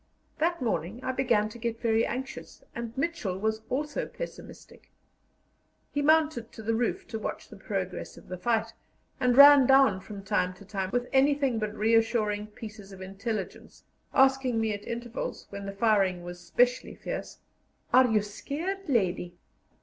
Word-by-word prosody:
That 335 -2 +1
morning 220 -1 -2
I 260 - 0
began 240 -5 +2
to 235 - -11
get 230 -1 -3
very 225 -1 +2
anxious, 265 +2 -6
and 235 -1 -5
Mitchell 270 - -2
was 220 +2 -1
also 295 +3 -2
pessimistic. - - -10 1.0
He 290 - -1
mounted 305 -5 +2
to 220 - -9
the 225 +2 0
roof 235 +1 -1
to 225 -1 -4
watch - - -5
the - - -11
progress - - -4
of - - -14
the 185 -1 -6
fight, 225 +2 0 0.5
and 250 0 +2
ran 285 -2 +10
down 265 -8 +5
from 200 +1 -9
time 185 -2 0
to 200 - -14
time 190 -1 -3
with 245 0 0
anything 275 -3 +3
but 215 0 -3
reassuring 220 -1 +2
pieces 210 -2 -10
of 190 - -11
intelligence, 195 +1 -5 0.3
asking 265 -3 +3
me 220 -1 0
at 205 0 -7
intervals, 235 0 -5
when 200 0 -6
the - - -3
firing 195 -4 +2
was 175 0 -8
specially 245 +8 +1
fierce: - - -6 0.6
"Are 255 0 +7
you 215 -3 +2
scared, 325 - -5
lady?" 180 -7 0
225 Hz, 160 wpm, -28 LUFS, 205-260 Hz, 1.0 s, ran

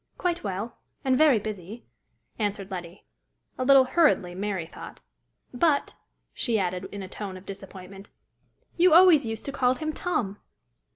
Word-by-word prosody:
"Quite 350 -2 -1
well 205 +3 -5 0.3
and 260 -1 +3
very 295 -3 +5
busy," 210 +1 -7 0.5
answered 205 -2 -2
Letty 175 0 -8 0.5
a 255 - -2
little 270 0 +7
hurriedly, 260 - +2
Mary 190 -2 -3
thought. - - -11 0.3
" - - -51 0.2
But," 285 +2 +1 0.4
she 235 -4 0
added, 185 -1 -2
in 200 -1 -6
a - - -7
tone 190 -1 -7
of 185 - -14
disappointment, 195 0 -10 0.7
"you 350 -1 +5
always 335 -8 +7
used 225 -1 -5
to 275 - -3
call 255 -2 +2
him 310 +2 -4
Tom!" 220 - -2
215 Hz, 155 wpm, -26 LUFS, 195-275 Hz, 0.7 s, little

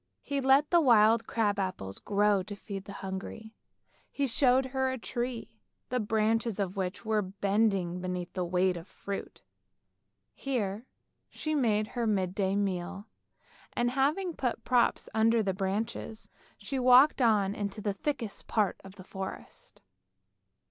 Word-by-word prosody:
He 280 -1 -2
let 270 +3 +4
the 345 -1 +6
wild 225 -4 +5
crab 205 -3 0
apples 100 - -3
grow 205 -1 +2
to 205 +3 -7
feed 195 -1 -7
the - - -8
hungry. 200 +3 -6 0.6
He 280 - -1
showed 260 +1 +3
her 265 0 -1
a 260 - -2
tree, 240 -2 -5 0.3
the 250 - 0
branches 220 0 0
of 195 -1 -2
which 190 +2 -3
were 215 -1 +2
bending 195 -2 0
beneath 180 -1 -4
their 185 - -1
weight 180 +1 +1
of 170 +2 -9
fruit. 200 -1 -7 0.9
Here 230 -4 -3 0.4
she 310 - -4
made 220 -7 +2
her 235 -2 -2
midday 190 -1 0
meal, 195 0 -2 0.7
and, 240 0 +1
having 305 +7 0
put 250 -3 -2
props 245 -2 +2
under 225 +1 +3
the 195 -2 0
branches, 205 +3 -4 0.3
she 270 - -4
walked 255 +3 +6
on 210 -4 +3
into 205 0 -4
the 205 -1 -1
thickest 230 0 -4
part 210 -4 0
of 195 0 -12
the 185 - -11
forest. 190 0 -8
215 Hz, 145 wpm, -30 LUFS, 195-245 Hz, 0.9 s, the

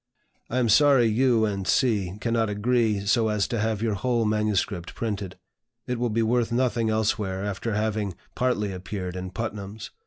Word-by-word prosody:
I 125 - -2
am 125 -2 +2
sorry 135 +2 +5
you 115 0 +3
and 100 -2 -3
C. 100 -6 +1
cannot 115 -1 0
agree 105 -1 +1
so 110 +2 +3
as 105 -2 0
to 115 - -1
have 110 0 -1
your 110 -2 +1
whole 115 +3 0
MS. 105 -2 +1 0.3
printed. 100 -5 -4 0.5
It 125 -1 -3
will 120 0 0
be 115 +1 +1
worth 115 0 +1
nothing 120 -2 +1
elsewhere 105 -3 0
after 105 +2 -3
having 105 -3 -1 0.2
partly 120 -5 0
appeared 90 0 -5
in 90 0 -5
Putnam's. 105 +1 -6
110 Hz, 165 wpm, -25 LUFS, 100-115 Hz, 0.5 s, sorry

